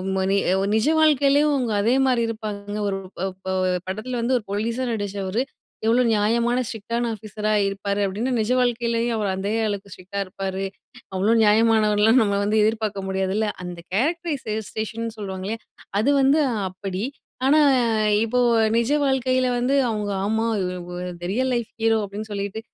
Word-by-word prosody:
ம 190 Hz, -, +1 dB
நி 200 Hz, -, +3 dB, 0.4 s
நிஜவாழ்க்கையிலயும் 295 Hz, +2 st, +4 dB
அவுங்க 250 Hz, -5 st, 0 dB
அதே 230 Hz, +4 st, +3 dB
மாரி 250 Hz, -3 st, +2 dB
இருப்பாங்க, 210 Hz, -2 st, -5 dB
ஒரு 195 Hz, -1 st, -1 dB, 0.2 s
ப -, -, -6 dB, 0.2 s
ப -, -, -7 dB, 0.4 s
படத்தில 235 Hz, +6 st, -3 dB
வந்து 250 Hz, +3 st, 0 dB
ஒரு 225 Hz, -, -5 dB
போலீஸா 230 Hz, +5 st, -1 dB
நடிச்சவரு 205 Hz, 0 st, -2 dB, 0.4 s
"எவ்வளோ 240 Hz, +3 st, +4 dB
நியாயமான 235 Hz, +4 st, +2 dB
ஸ்ட்ரிக்ட் 225 Hz, 0 st, -8 dB
டான 235 Hz, 0 st, 0 dB
ஆஃபீஸரா 215 Hz, 0 st, -3 dB
இருப்பாரு" 200 Hz, +1 st, -2 dB
அப்டின்னு, 215 Hz, +7 st, -2 dB
நிஜ 220 Hz, +3 st, 0 dB
வாழ்க்கைலயும் 235 Hz, -1 st, 0 dB
அவர் 205 Hz, -2 st, -1 dB
அதே 200 Hz, +3 st, -2 dB
அளவுக்கு 200 Hz, -1 st, -4 dB
ஸ்ட்ரிக்டா 190 Hz, +2 st, -7 dB
இருப்பாரு 190 Hz, +1 st, -4 dB, 0.5 s
அவ்ளோ 210 Hz, +5 st, +3 dB
நியாயமானவர்னெல்லாம் 220 Hz, +1 st, +4 dB
நம்ம 200 Hz, -1 st, 0 dB
வந்து 210 Hz, +2 st, +1 dB
எதிர்பாக்க 215 Hz, -3 st, -1 dB
முடியாதுல்ல! 190 Hz, +3 st, 0 dB, 0.2 s
அந்த 175 Hz, -1 st, -6 dB
"கேரக்டரைஸ்டேஷன்" 230 Hz, -, -2 dB
சொல்வாங்கல்லயா, 195 Hz, +2 st, -4 dB, 0.4 s
அது 235 Hz, -, +2 dB
வந்து 275 Hz, +4 st, +4 dB, 0.3 s
அப்படி. 190 Hz, +1 st, -5 dB, 0.4 s
ஆனா, 305 Hz, +2 st, +5 dB, 0.6 s
இப்போ 250 Hz, +2 st, 0 dB, 0.4 s
நிஜ 235 Hz, +4 st, +1 dB
வாழ்க்கையில 255 Hz, -1 st, +1 dB
வந்து 260 Hz, +3 st, +1 dB
அவுங்க, 210 Hz, -2 st, -2 dB
"ஆமா 220 Hz, +2 st, 0 dB, 0.2 s
இ -, -, -1 dB, 0.2 s
வொ -, -, -7 dB, 0.2 s
இந்த 175 Hz, 0 st, -9 dB
ரியல் 260 Hz, +2 st, 0 dB
லைஃப் 235 Hz, -2 st, -3 dB
ஹீரோ" 225 Hz, -1 st, +3 dB
அப்டின்னு 210 Hz, +2 st, -7 dB
சொல்லிட்டு, 200 Hz, +2 st, -3 dB
220 Hz, 150 wpm, -23 LUFS, 200-240 Hz, 0.6 s, ஆனா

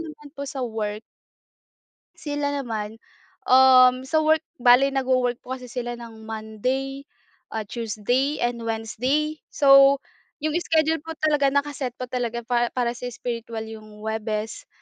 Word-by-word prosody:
naman 305 Hz, -3 st, -9 dB
po 280 Hz, -, -4 dB
sa 270 Hz, -1 st, -5 dB
work. 215 Hz, -2 st, -3 dB, 1.2 s
Sila 290 Hz, -1 st, -2 dB
naman, 220 Hz, -2 st, -5 dB, 0.5 s
um, 255 Hz, 0 st, +7 dB
sa 315 Hz, +3 st, +2 dB
work 315 Hz, +1 st, +2 dB, 0.2 s
bale 250 Hz, +3 st, +6 dB
nag-wo-work 255 Hz, -2 st, +1 dB
po 260 Hz, +1 st, -5 dB
kasi 250 Hz, -, -11 dB
sila 240 Hz, -1 st, -4 dB
ng 225 Hz, -2 st, -11 dB
Monday, 255 Hz, +6 st, -3 dB, 0.5 s
ah, 220 Hz, -1 st, -4 dB
Tuesday 240 Hz, +6 st, -1 dB
and 240 Hz, -1 st, -1 dB
Wednesday. 250 Hz, +7 st, -1 dB
So, 275 Hz, 0 st, +6 dB, 0.4 s
yung 305 Hz, +1 st, -1 dB
schedule 320 Hz, -1 st, +2 dB
po 325 Hz, 0 st, -8 dB
talaga 295 Hz, -3 st, +2 dB
naka-set 280 Hz, -3 st, -2 dB
po 255 Hz, -, -4 dB
talaga 240 Hz, -1 st, -3 dB
pa 240 Hz, 0 st, +1 dB
para 245 Hz, -2 st, 0 dB
sa 245 Hz, +1 st, -6 dB
spiritual 230 Hz, -2 st, -5 dB
yung 215 Hz, -1 st, -11 dB
Huwebes, 220 Hz, 0 st, -3 dB
250 Hz, 140 wpm, -24 LUFS, 225-280 Hz, 1.2 s, um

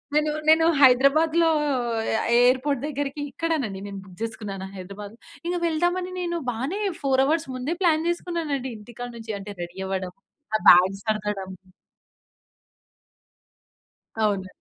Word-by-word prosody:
నేను 300 Hz, 0 st, +2 dB, 0.2 s
నేను 325 Hz, +1 st, +6 dB, 0.2 s
హైదరాబాద్‌లో 310 Hz, +6 st, +5 dB, 0.6 s
ఎ -, -, +2 dB, 0.2 s
ఎయిర్‌పోర్ట్ 255 Hz, +2 st, +3 dB
దగ్గరికి 285 Hz, 0 st, -3 dB
ఇక్కడేనండి 275 Hz, -13 st, -2 dB
నేను 200 Hz, -, -7 dB
బుక్ 180 Hz, -2 st, -15 dB
చేసుకున్నాను 200 Hz, -4 st, -5 dB
హైదరాబాద్. 200 Hz, +3 st, -9 dB, 0.3 s
ఇంకా 355 Hz, 0 st, -1 dB
వెళ్దామని 350 Hz, +3 st, 0 dB
నేను 345 Hz, -1 st, -2 dB
బానే 275 Hz, -, -3 dB, 0.2 s
4:00 265 Hz, -1 st, +3 dB
హౌర్స్ 315 Hz, +2 st, 0 dB
ముందే 265 Hz, +7 st, -2 dB
ప్లాన్ 325 Hz, -1 st, +3 dB
చేసుకున్నానండి 320 Hz, -7 st, -2 dB
ఇంటికాడ 240 Hz, +3 st, -8 dB
నుంచి 225 Hz, -1 st, -6 dB
అంటే 205 Hz, +1 st, -8 dB
రెడీ 175 Hz, +2 st, -9 dB
అవ్వడం 185 Hz, -2 st, -3 dB, 0.4 s
ఆ -, -, +2 dB
బ్యాగ్స్ 190 Hz, +2 st, +6 dB
సర్దడం. 210 Hz, -3 st, -2 dB, 2.7 s
అవును. 195 Hz, -3 st, 0 dB
255 Hz, 120 wpm, -24 LUFS, 205-320 Hz, 2.7 s, నేను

